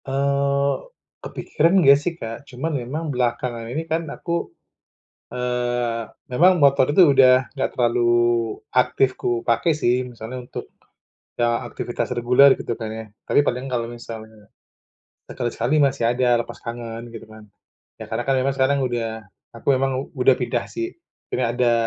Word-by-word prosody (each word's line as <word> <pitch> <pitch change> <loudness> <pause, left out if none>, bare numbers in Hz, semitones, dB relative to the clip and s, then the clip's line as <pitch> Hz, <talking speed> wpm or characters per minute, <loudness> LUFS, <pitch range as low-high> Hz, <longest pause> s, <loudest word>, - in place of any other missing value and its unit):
Eee, 140 +1 +1 0.5
kepikiran 165 +4 0
enggak 140 -6 +7
sih 170 +3 -2
Kak, 115 +2 -8
cuma 155 +6 -4
memang 145 +4 -3
belakangan 120 -1 -2
ini 155 +6 -3
kan 165 +1 -1
aku, 170 +3 -3 0.8
eee, 120 -1 -1 0.2
memang 175 +8 +4
motor 140 -1 +4
itu 150 -3 +6
udah 130 -1 +6
enggak 135 - -1
terlalu 120 -1 +1 0.7
aktif 125 +1 +2
ku 120 -1 -1
pakai 115 +8 +2
sih, 130 -4 +1
misalnya 120 +2 -7
untuk, 120 - -8 0.7
eee, 120 0 +2
aktivitas 120 - -4
reguler 125 +3 +5
gitu 115 - -3
kan 110 -1 -5
ya. 110 0 -6 0.2
Tapi - - +3
paling 125 -3 -1
kalau 115 -2 -1
misalnya 110 -3 -10 0.7
sekali-sekali 120 +4 -1
masih 140 -3 +2
ada 125 -1 +2
lepas - - -11
tangan 115 -1 -6
gitu 115 -1 -10
kan. 110 -1 -14 0.5
Ya - - -8
karena - - -1
kan 135 - +3
memang 135 - +1
sekarang 135 +1 +2
udah 115 -3 -3 0.3
aku 115 - -7
emang 135 0 +1 0.2
udah 130 -1 +4
pindah 120 -1 -2
sih, 345 +1 -4 0.4
jadi 120 -1 0
ada 120 -1 +3
125 Hz, 150 wpm, -22 LUFS, 120-140 Hz, 0.8 s, enggak